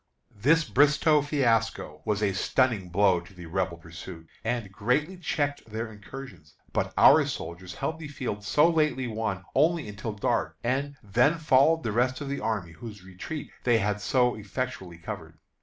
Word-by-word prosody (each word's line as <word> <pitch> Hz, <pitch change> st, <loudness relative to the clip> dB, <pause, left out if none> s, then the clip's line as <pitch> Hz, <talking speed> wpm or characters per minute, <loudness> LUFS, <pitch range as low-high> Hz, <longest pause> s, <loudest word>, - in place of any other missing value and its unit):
This 150 Hz, +11 st, +3 dB
Bristoe 150 Hz, +2 st, +4 dB
fiasco 130 Hz, -6 st, 0 dB
was 105 Hz, 0 st, 0 dB
a 100 Hz, -2 st, +2 dB
stunning 105 Hz, -1 st, +1 dB
blow 95 Hz, 0 st, +3 dB
to 85 Hz, +3 st, -15 dB
the 90 Hz, -1 st, -10 dB
Rebel 90 Hz, 0 st, -2 dB
pursuit, 85 Hz, 0 st, -10 dB, 0.2 s
and 115 Hz, -3 st, -2 dB
greatly 125 Hz, -, 0 dB
checked 145 Hz, -5 st, -2 dB
their 110 Hz, +1 st, -4 dB
incursions. 105 Hz, -, -11 dB, 0.2 s
But -, -, 0 dB
our -, -, +8 dB
soldiers 85 Hz, +2 st, -6 dB
held 160 Hz, 0 st, -3 dB
the 160 Hz, -, -6 dB
field 130 Hz, -8 st, -5 dB
so 150 Hz, -, +4 dB
lately 155 Hz, -5 st, +1 dB
won 110 Hz, -5 st, -3 dB
only 160 Hz, 0 st, +2 dB
until 105 Hz, +2 st, -5 dB
dark, 80 Hz, -6 st, -1 dB
and 135 Hz, +4 st, -1 dB
"then 125 Hz, +10 st, +3 dB
followed 155 Hz, +1 st, +4 dB
the 110 Hz, -, -1 dB
rest 125 Hz, +4 st, +1 dB
of 145 Hz, -2 st, -5 dB
the 140 Hz, 0 st, -2 dB
army, 105 Hz, -7 st, -2 dB
whose 105 Hz, +3 st, -10 dB
retreat 95 Hz, +12 st, -7 dB
they 120 Hz, -2 st, +4 dB
had 105 Hz, -1 st, -1 dB
so 125 Hz, +2 st, +2 dB
effectually 105 Hz, -4 st, -5 dB
covered." 85 Hz, -, -8 dB
115 Hz, 165 wpm, -27 LUFS, 95-140 Hz, 0.2 s, our